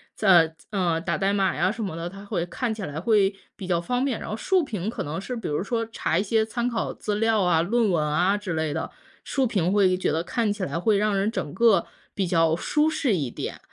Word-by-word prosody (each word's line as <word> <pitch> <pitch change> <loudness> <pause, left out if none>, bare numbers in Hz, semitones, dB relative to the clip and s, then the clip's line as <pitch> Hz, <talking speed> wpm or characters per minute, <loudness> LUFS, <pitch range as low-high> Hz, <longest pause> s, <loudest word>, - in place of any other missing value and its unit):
在 170 -6 +4
嗯， 175 -5 0
打 - - -1
代 195 +1 +1
码 195 -3 +1
呀 185 +2 +2
什 230 +2 -6
么 190 -6 -4
的， 165 +1 -4
它 195 +3 -9
会 175 -4 -2
看 235 +6 -3
起 220 -2 -5
来 150 -4 -4
会 200 +1 +3 0.2
比 190 - -8
较 175 -2 0
方 245 +8 -1
便。 260 -5 -1
然 - - -7
后 215 - -3
竖 375 +7 +2
屏 210 - -4
可 - - -5
能 150 +4 -4
是 250 +6 -5
比 230 - -5
如 150 +4 -1
说 230 +3 -1
查 - - -1
一 - - +1
些 220 +1 +1
参 235 +2 -2
考 230 -2 -2
资 210 - -3
料 225 0 +2
啊、 175 -3 +3
论 225 +4 +2
文 165 -4 +1
啊 175 +7 +2
之 205 -4 -4
类 160 -1 -1
的， 160 - -3 0.3
竖 270 -2 0
屏 185 -6 0
会 190 -3 +3
觉 185 - 0
得 160 +2 0
看 225 +3 0
起 205 - -5
来 165 - -2
会 210 +3 +2
让 210 0 +1
人 200 +3 +1
整 185 -9 -4
个 200 -3 +4 0.3
比 195 -2 -1
较 165 -2 +3
舒 300 - +1
适 275 -8 +1
一 145 -7 -2
点。 - - -6
195 Hz, 270 characters per minute, -25 LUFS, 170-220 Hz, 0.3 s, 在